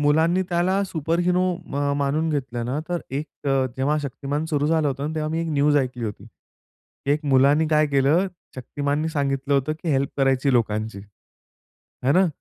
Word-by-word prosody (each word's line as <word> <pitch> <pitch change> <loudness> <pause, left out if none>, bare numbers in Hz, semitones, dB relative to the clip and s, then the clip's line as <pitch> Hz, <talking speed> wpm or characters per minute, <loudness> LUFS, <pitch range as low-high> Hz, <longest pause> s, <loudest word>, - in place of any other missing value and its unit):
मुलांनी 160 +5 +3
त्याला 185 +3 +1
सुपरहीरो 175 +2 0
अ, - - -13
म 140 0 -1
मानून 150 +3 0
घेतलं 125 -5 -2
ना, 135 +4 -2
तर 175 -1 -1
एक 145 +3 -3 0.2
अ, 135 -1 +2
जेव्हा 145 +3 +1
शक्तिमान 140 +3 -3
सुरू 150 -2 0
झालं 160 -2 +2
होतं, 140 +4 -3
तेव्हा 155 -1 -2
मी 165 +1 -1
एक 165 - -2
न्यूज 145 +1 +3
ऐकली 125 -3 -1
होती. 105 0 -6 0.9
एक 150 +1 -1
मुलांनी 140 +3 +4
काय 155 -1 +3
केलं? 145 +7 +3 0.3
शक्तिमाननी 145 +4 -2
सांगितलं 140 -2 -1
होतं, 140 +3 +1
की 170 - -3
हेल्प 135 0 +1
करायची 135 0 +2
लोकांची, 110 -3 0 1.1
है 135 - +4
ना? 185 +2 +4
145 Hz, 170 wpm, -23 LUFS, 135-160 Hz, 1.1 s, मुलांनी